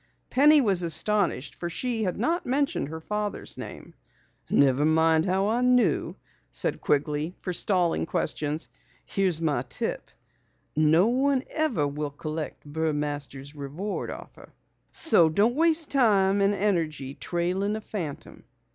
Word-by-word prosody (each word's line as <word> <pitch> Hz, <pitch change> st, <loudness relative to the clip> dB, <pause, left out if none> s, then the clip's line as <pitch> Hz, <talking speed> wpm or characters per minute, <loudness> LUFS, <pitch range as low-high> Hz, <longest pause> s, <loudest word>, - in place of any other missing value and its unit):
Penny 295 Hz, +3 st, +6 dB
was 195 Hz, -7 st, +3 dB
astonished 170 Hz, -4 st, 0 dB
for 175 Hz, -, -5 dB
she 235 Hz, +5 st, -2 dB
had 180 Hz, -, -2 dB
not 330 Hz, -, 0 dB
mentioned 280 Hz, -, 0 dB
her 160 Hz, +1 st, -6 dB
father's 210 Hz, +4 st, -4 dB
name. -, -, -9 dB, 0.6 s
"Never 140 Hz, 0 st, +3 dB
mind 160 Hz, +1 st, +3 dB
how 190 Hz, +2 st, +1 dB
I 235 Hz, +3 st, +1 dB
knew," 250 Hz, -1 st, +2 dB, 0.3 s
said -, -, 0 dB
Quigley, 150 Hz, +3 st, -1 dB
forestalling 180 Hz, -2 st, +1 dB
questions. 155 Hz, -2 st, -2 dB, 0.4 s
"Here's 185 Hz, -5 st, 0 dB
my 155 Hz, -3 st, 0 dB
tip. -, -, -3 dB, 0.7 s
No 155 Hz, +4 st, +4 dB
one 260 Hz, +3 st, +1 dB
ever 290 Hz, -, +1 dB
will 145 Hz, +1 st, -4 dB
collect 155 Hz, +2 st, -6 dB
Burmaster's 145 Hz, -2 st, -3 dB
reward 150 Hz, +8 st, -5 dB
offer. -, -, -11 dB, 0.4 s
So 175 Hz, -, +4 dB
don't 205 Hz, +9 st, +2 dB
waste 325 Hz, +1 st, +3 dB
time 200 Hz, -7 st, +3 dB
and 200 Hz, +1 st, +2 dB
energy 160 Hz, -9 st, -1 dB
trailing 180 Hz, +6 st, -2 dB
a 220 Hz, -, -5 dB
phantom." 175 Hz, -10 st, -7 dB
180 Hz, 130 wpm, -26 LUFS, 155-215 Hz, 0.7 s, Penny